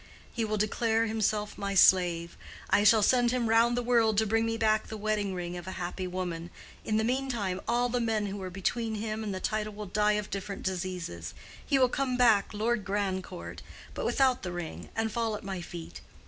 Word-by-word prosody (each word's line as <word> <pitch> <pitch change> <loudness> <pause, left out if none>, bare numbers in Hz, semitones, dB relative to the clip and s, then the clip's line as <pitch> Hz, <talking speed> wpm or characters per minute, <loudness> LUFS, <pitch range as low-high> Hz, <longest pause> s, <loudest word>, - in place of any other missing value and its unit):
He 235 - -1
will 215 -1 -1
declare 225 +2 +1
himself 215 -1 -1
my 200 0 -2
slave—I 175 +2 +3
shall 215 0 +6
send 245 +2 +4
him 245 -1 0
round 230 +2 +4
the 245 - 0
world 230 -3 +3
to 220 - +4
bring 225 +2 +1
me 225 0 -1
back 215 -1 +2
the 220 - -6
wedding 210 -2 -1
ring 175 0 -4
of 175 0 -7
a 190 - -4
happy 180 +1 -4
woman—in 180 +3 -5
the 220 - +2
meantime 235 -7 -1
all 245 +1 +2
the 245 0 -1
men 225 -3 0
who 200 0 -5
are 185 - -4
between 220 +5 -2
him 215 +1 -3
and 210 - -3
the 190 - -3
title 215 0 -2
will 210 +1 -6
die 210 +2 +2
of 210 -1 -3
different 200 0 -5
diseases—he 185 - -4
will 255 -1 +5
come 255 0 -1
back 225 -5 +4
Lord 215 0 0
Grandcourt—but 190 -2 -5
without 260 -2 +2
the 180 - -4
ring—and 175 +6 -4
fall 225 -1 -1
at - - -8
my 190 -2 -4
feet. 170 -1 -8
210 Hz, 190 wpm, -29 LUFS, 190-225 Hz, -, shall